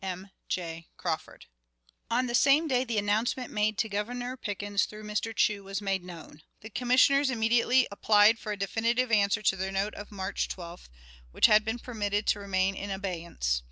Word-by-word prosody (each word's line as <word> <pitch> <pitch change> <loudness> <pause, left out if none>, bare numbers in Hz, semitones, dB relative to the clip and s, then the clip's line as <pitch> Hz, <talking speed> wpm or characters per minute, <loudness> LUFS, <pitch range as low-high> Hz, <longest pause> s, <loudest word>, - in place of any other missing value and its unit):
"M. 190 +1 -6 0.2
J. 165 -2 -4
Crawford." - - -4 0.6
On 245 +2 +1
the 240 - -4
same 280 +6 +4
day 255 -3 +2
the 235 -3 -3
announcement 220 +5 0
made 210 0 0
to - - 0
Governor 245 +5 -3
Pickens 205 -4 -2
through 215 0 -11
Mr. 210 +1 -2
Chew 205 -2 +1
was 195 0 -4
made 195 -3 -2
known. 165 -3 -11 0.2
The 220 - -10
Commissioners 255 +4 +3
immediately 240 +2 +3
applied 210 +2 +4
for 215 - -5
a 205 - -3
definitive 230 +5 0
answer 205 -1 +2
to 190 - +3
their 190 +1 -3
note 195 +2 -1
of 205 - -9
March 190 -2 -3
12th, 175 - -9 0.4
which - - +4
had 215 0 +6
been 225 +2 -2
permitted 210 -4 -2
to 205 - +1
remain 195 -1 0
in 200 +1 -6
abeyance. 170 - -2
210 Hz, 180 wpm, -28 LUFS, 195-235 Hz, 0.6 s, had